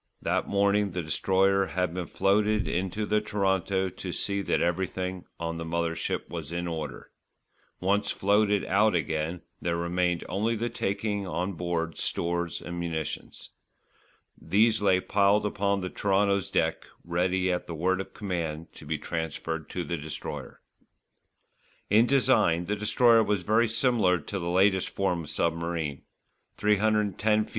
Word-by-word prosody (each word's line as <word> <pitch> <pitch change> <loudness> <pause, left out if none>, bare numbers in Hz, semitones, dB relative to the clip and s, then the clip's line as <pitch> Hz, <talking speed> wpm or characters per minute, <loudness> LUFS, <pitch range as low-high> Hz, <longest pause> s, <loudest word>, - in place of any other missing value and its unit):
That - - 0
morning 100 0 +2
the 90 - -2
Destroyer 95 +4 +2
had 90 -2 -1
been 90 -1 -4
floated 105 +2 +2
into 95 +4 -1
the 105 0 +1
Toronto 95 -2 0
to 95 0 -6
see 100 +3 -1
that - - 0
everything 90 +1 -2
on 85 0 -3
the 80 - -4
mother 85 0 -1
ship - - -3
was 80 -3 -6
in 85 0 -2
order. 80 -6 -5 0.7
Once 100 +2 +1
floated 105 0 +2
out 105 +1 +3
again, 80 +2 -1 0.2
there 85 -1 -1
remained 90 0 0
only 110 +5 0
the 120 +2 -2
taking 100 0 -2
on 90 +2 -2
board 85 -1 -3
stores 85 0 -2
and 85 0 -6
munitions. 80 -2 -5 0.9
These 110 +2 +3
lay 95 -2 +4
piled 100 +2 +3
upon 100 -1 0
the 90 - -3
Toronto's 100 -1 +1
deck - - 0 0.2
ready 90 +2 +1
at 90 - -2
the 85 - -5
word 95 +4 +1
of - - -11
command 85 -5 -4
to 75 - -12
be 80 +1 -1
transferred 80 0 -4
to 90 - -3
the 85 - -3
Destroyer. 75 0 -7 1.3
In 110 +3 +6
design 125 -11 +3
the 105 +4 -1
Destroyer 115 +2 +4
was 105 -4 0
very 110 +4 +3
similar 110 -5 +3
to 95 +5 -5
the 85 -1 -3
latest 95 +1 +3
form 90 -4 -1
of - - -10
submarine: 85 -3 -1 0.6
310 105 0 +2
ft. - - -17
95 Hz, 150 wpm, -28 LUFS, 85-105 Hz, 1.3 s, In